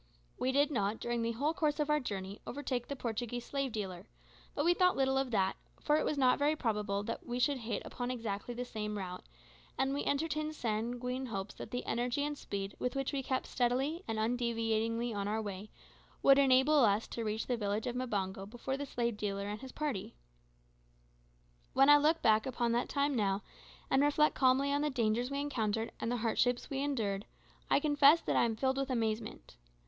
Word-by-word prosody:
We 255 - +1
did 285 +2 +3
not, 210 -4 0
during 240 0 -1
the 230 0 0
whole 285 +7 0
course 305 -2 0
of 300 - +1
our 300 - +4
journey, 200 -5 -5
overtake 255 -3 -3
the 280 - -4
Portuguese 240 -1 -3
slave 275 -2 -2
dealer; 190 -4 -5 0.5
but 295 - 0
we 350 - +5
thought 365 0 +3
little 265 0 +2
of 270 -1 +1
that, 195 -5 +1 0.2
for 300 - +2
it - - 0
was 300 - -1
not 255 -1 +4
very 295 +2 +3
probable 210 -6 -1
that 230 - -4
we 240 0 -4
should 260 +2 +2
hit 225 -2 -3
upon 245 -1 -4
exactly 230 -1 -4
the 250 +1 -3
same 210 -3 -4
route, 180 -2 -5 0.5
and 270 +1 +1
we 285 - -1
entertained 310 +1 -1
sanguine 245 +2 -2
hopes 195 -3 -4
that - - -8
the 245 - -4
energy 245 +4 0
and 295 0 -2
speed 200 -7 -5
with 250 +2 -2
which 270 +1 -1
we 275 - 0
kept 260 0 -1
steadily 265 +7 0
and 225 - -2
undeviatingly 230 0 0
on 200 -1 -2
our 215 +2 0
way 205 -1 -5 0.5
would 275 0 +7
enable 275 +2 +5
us 210 0 +3
to 230 - -4
reach 215 0 -2
the 250 - 0
village 210 -1 -2
of 245 -1 -2
Mbango 195 -6 -2
before 250 +4 -4
the 285 0 -4
slave 235 -4 -1
dealer 200 -1 -2
and 210 +1 -5
his 265 - -8
party. 285 -11 -3 1.6
When 270 +1 +5
I 290 - +10
look 310 +3 +2
back 220 +1 +4
upon 240 -2 0
that 240 +1 0
time 280 -1 +1
now, 200 -3 0 0.4
and 270 - +3
reflect 295 +1 +3
calmly 270 +2 +3
on 285 - +1
the 300 - +1
dangers 240 -2 0
we 280 0 -2
encountered 225 -6 -1
and 230 - -2
the 245 - 0
hardships 240 +3 0
we 270 - -1
endured, 220 -8 -1 0.4
I - - +5
confess 290 +1 +6
that - - -1
I - - +4
am 225 -1 -1
filled 265 +3 0
with 275 0 -1
amazement. 220 - -3
245 Hz, 205 wpm, -33 LUFS, 215-275 Hz, 1.6 s, I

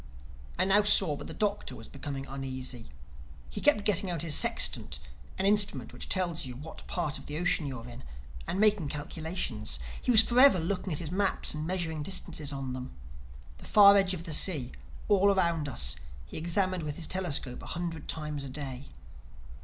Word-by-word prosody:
I 185 - +2
now 195 +2 +5
saw 195 -6 +3
that - - -8
the - - -7
Doctor 205 -1 -1
was - - -10
becoming 140 -2 -6
uneasy. 130 -3 -5 0.6
He 205 - -5
kept 210 -9 +4
getting 195 -2 +2
out 170 -3 -2
his 160 -3 0
sextant - - +2 0.4
(an 190 - -1
instrument 200 - +1
which - - -8
tells 175 -4 0
you 125 -3 -7
what 150 +5 -10
part 155 -5 -2
of - - -13
the 150 - -4
ocean 170 -3 +1
you 135 -2 -5
are 115 +1 -10
in) 120 +1 -10 0.4
and 190 - -2
making 210 -6 +3
calculations. 150 - -3 0.2
He - - -5
was 225 -2 +8
forever 245 -4 +6
looking 185 +3 -2
at 150 - -1
his 160 -1 -3
maps 195 +1 +1
and 155 +1 -4
measuring 170 -4 -2
distances 155 -3 -2
on 135 -2 -4
them. 125 - -7 0.6
The - - -12
far 200 -1 +8
edge 195 -2 +3
of 170 - -7
the 165 -3 -4
sea, 150 -6 +2 0.4
all 200 -1 +4
around 170 -6 +1
us, 115 -8 0 0.3
he - - -11
examined 180 +3 0
with 150 -2 -4
his 170 - -3
telescope 150 -9 -1
a - - -10
hundred 165 -2 -4
times 150 -2 -3
a 135 - -6
day. 135 -1 -6
165 Hz, 190 wpm, -30 LUFS, 140-190 Hz, 0.6 s, was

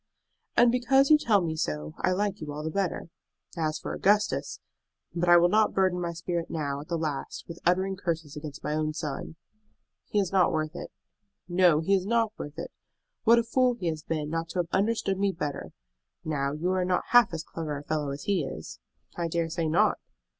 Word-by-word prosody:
"And 240 -1 +6
because 270 +3 +3
you 305 - +9
tell 210 -8 +3
me 160 -2 -2
so 75 - -3
I - - +1
like 200 0 -1
you 150 -1 -5
all 150 +1 -5
the 160 - -3
better. 190 -3 -2 0.5
As 155 -2 -1
for - - -5
Augustus 210 +2 +1 0.5
But 175 0 0
I 175 - +9
will 175 +1 +5
not 215 +3 +2
burden 185 -2 +2
my 170 -1 -2
spirit 170 0 -3
now, 145 -3 -3
at 150 - -12
the 170 - -1
last, 150 -4 -4
with 170 0 -8
uttering 190 +2 +2
curses 165 -5 -3
against 150 -1 -8
my 150 - -1
own 155 0 -1
son." 155 0 -5 0.7
"He - - -2
is 190 -3 0
not 190 -2 +4
worth 155 0 -2
it." - - -7 0.6
"No, 175 -3 +4
he 195 +5 +1
is 190 -1 +1
not 230 -1 +1
worth 145 0 -7
it. - - -6 0.5
What 230 +1 +7
a 235 - +3
fool 250 +1 +2
he 180 -7 -2
has 155 -1 -4
been 155 -1 -3
not 165 0 -2
to 175 - -6
have 170 - -8
understood 195 -1 0
me 200 0 +2
better! 150 -5 -5 0.5
Now, 140 -3 -1
you 170 +5 -1
are 185 -1 +1
not 180 0 0
half 240 -4 +6
as 165 -1 -4
clever 155 -2 -5
a 145 - -8
fellow 150 -1 -2
as 140 +1 -5
he 195 -6 +1
is." 80 - -7 0.4
"I 170 -1 -1
dare 165 0 -1
say 165 0 -1
not." 160 +2 +3
170 Hz, 210 wpm, -28 LUFS, 155-195 Hz, 0.7 s, you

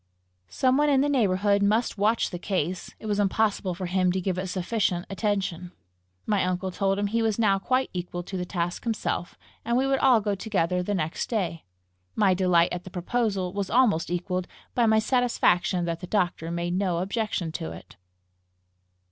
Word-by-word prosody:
Some 260 - +2
one 295 0 +3
in 270 -2 +4
the 290 - +1
neighbourhood 200 -5 +2
must 215 +4 +2
watch 220 +3 +2
the 175 - -5
case; 180 -1 -2
it - - -11
was 205 -1 0
impossible 205 -2 +1
for 185 +1 -4
him 180 0 +1
to 190 - 0
give 185 0 -2
it 185 - -3
sufficient 185 -1 -1
attention. 195 -4 -2 0.5
My 205 -2 +1
uncle 185 +1 -1
told 195 +1 0
him 205 - 0
he 230 +3 0
was 220 -2 +1
now 200 -4 +3
quite 255 +6 0
equal 175 -1 -4
to 190 - -7
the 180 - -2
task 175 -1 -3
himself, 220 -6 -2 0.3
and 235 +1 +1
we 265 - +2
would 270 0 +1
all 255 -4 +5
go 205 -1 -1
together 185 -3 0
the 205 +3 -1
next 160 -2 -2
day. 180 -8 -2 0.5
My 195 -3 +4
delight 180 -2 +3
at 180 0 -4
the 185 - -9
proposal 190 0 -1
was 200 -1 -2
almost 230 -11 +3
equalled 180 +1 -2 0.3
by 240 -2 +3
my 220 0 +4
satisfaction 220 -7 +2
that 170 -1 -2
the 180 - -7
doctor 175 -5 0
made 170 +1 -2
no 185 -2 0
objection 195 -2 -2
to 80 - -5
it. 85 - -12
195 Hz, 190 wpm, -26 LUFS, 180-220 Hz, 0.5 s, all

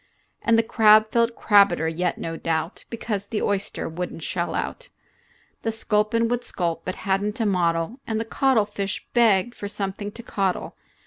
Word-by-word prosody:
And 230 -1 +3
the 230 - +4
crab 215 -1 +5
felt 235 0 +2
crabedder 200 -6 +4
yet 170 +2 -1
no 165 0 -4
doubt, 165 +1 -3
Because 210 -3 -4
the 215 -1 -2
oyster 200 -1 -2
would 175 +2 -4
n't 165 - -9
shell 170 +2 -2
out. - - -4 0.7
The 225 - -1
sculpin 220 +1 +1
would 245 +1 -1
sculp, 170 -6 -2
but 185 - -4
had 195 0 +2
n't 210 +4 -3
a 225 - +1
model, 175 +3 0
And 220 -1 -1
the 225 - -2
coddlefish 210 -6 0
begged 235 -2 +4
for 205 - -6
something 200 0 -4
to 235 - -9
coddle. 195 -4 -2
205 Hz, 175 wpm, -24 LUFS, 180-225 Hz, 0.7 s, crab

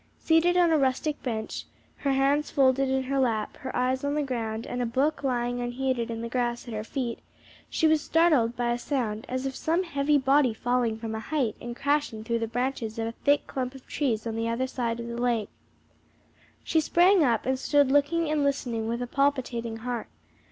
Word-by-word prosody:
Seated 335 +2 +3
on 345 -2 +4
a 315 - +4
rustic 275 +3 0
bench, 220 -4 -4 0.3
her 275 -1 0
hands 280 +2 +2
folded 270 0 +3
in 265 0 +1
her 270 +1 -1
lap, 225 -5 0
her 260 - -6
eyes 255 +1 0
on 285 +1 0
the 300 - +1
ground 230 -4 -3
and 245 - -3
a - - +1
book 275 +6 0
lying 245 -2 -1
unheeded 245 -1 -1
in 230 -1 -4
the 235 - -3
grass 240 0 -2
at 235 - -6
her 215 0 -3
feet, 235 0 -3 0.5
she - - 0
was 315 -1 +4
startled 300 -10 +3
by 240 0 0
a 240 - -1
sound 240 -4 -2
as 255 +1 -2
of 265 -1 -3
some 335 +6 0
heavy 290 -3 +1
body 265 -3 +3
falling 240 -2 0
from 225 0 -5
a 220 - -3
height 245 -2 -1
and 240 0 -6
crashing 285 -6 0
through 230 +1 -1
the 225 - -2
branches 240 -1 -2
of 225 - -1
a 225 - -2
thick 285 +4 +1
clump 255 0 -4
of 265 - -12
trees 240 -7 -1
on 225 -1 -3
the 225 0 -1
other 235 +3 0
side 235 -3 -2
of 235 - -5
the 235 0 -5
lake. 235 -4 0 1.1
She 320 - +2
sprang 350 +3 +4
up 235 -5 +1
and 260 0 0
stood 285 -1 +3
looking 300 +4 +2
and 300 -1 +1
listening 245 -5 -1
with 235 +2 -2
a - - -5
palpitating 250 -4 0
heart. 245 -2 -3
255 Hz, 210 wpm, -27 LUFS, 235-285 Hz, 1.1 s, on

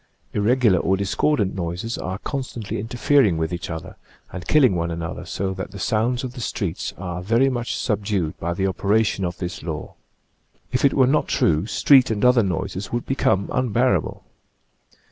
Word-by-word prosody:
Irregular 110 -2 +3
or 95 +3 +1
discordant 100 +2 +1
noises 90 +5 -3
are 95 +1 -4
constantly 115 -4 -4
interfering 115 - +2
with 80 +2 -2
each 85 0 -5
other 80 -1 -7 0.4
and 90 -3 -7
killing 135 -9 +5
one 85 0 -1
another 85 0 -5
so 95 0 -2
that 95 0 -6
the 100 - -10
sounds 115 +6 0
of 125 -1 -5
the 125 - -7
streets 100 -5 -3
are 90 -2 -5
very 115 +8 +3
much 120 -2 -2
subdued 100 -7 -1
by 85 +1 -2
the 95 - 0
operation 100 +2 +1
of 90 -1 -3
this 95 +1 -5
law. 80 -3 -5 0.8
If 125 +1 0
it 140 - +4
were 130 - +5
not 145 +4 +2
true, 80 +4 +1
street 130 +1 +5
and 110 0 0
other 125 -1 +6
noises 95 0 -3
would 120 0 -2
become 100 -7 +1
unbearable. 120 -7 +1
100 Hz, 170 wpm, -22 LUFS, 90-125 Hz, 0.8 s, other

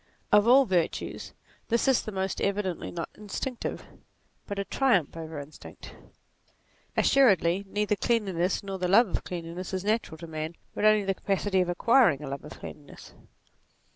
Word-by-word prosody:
Of 210 +1 +5
all 265 +3 +7
virtues 180 -5 -2 0.4
this 235 +3 +1
is 265 -2 +4
the 215 - -6
most 190 -1 -3
evidently 200 -3 -1
not 165 -2 -5
instinctive, 230 +4 -5 0.6
but 200 - -5
a 200 - -2
triumph 205 - +1
over 160 -1 -7
instinct. 145 +2 -10 1.0
Assuredly 195 - +4
neither 210 +1 0
cleanliness 195 -6 0
nor 195 -1 -5
the 180 - 0
love 205 +4 +5
of - - -3
cleanliness 175 +2 -5
is 190 +1 -4
natural 215 -6 -1
to 170 - -9
man, 160 0 -5 0.2
but - - -1
only 215 -1 +5
the 195 - +1
capacity 195 0 0
of 180 - -1
acquiring 175 - +3
a 140 - -5
love 140 0 -5
of 150 - -9
cleanliness. 145 -2 -11
195 Hz, 160 wpm, -27 LUFS, 170-210 Hz, 1.0 s, all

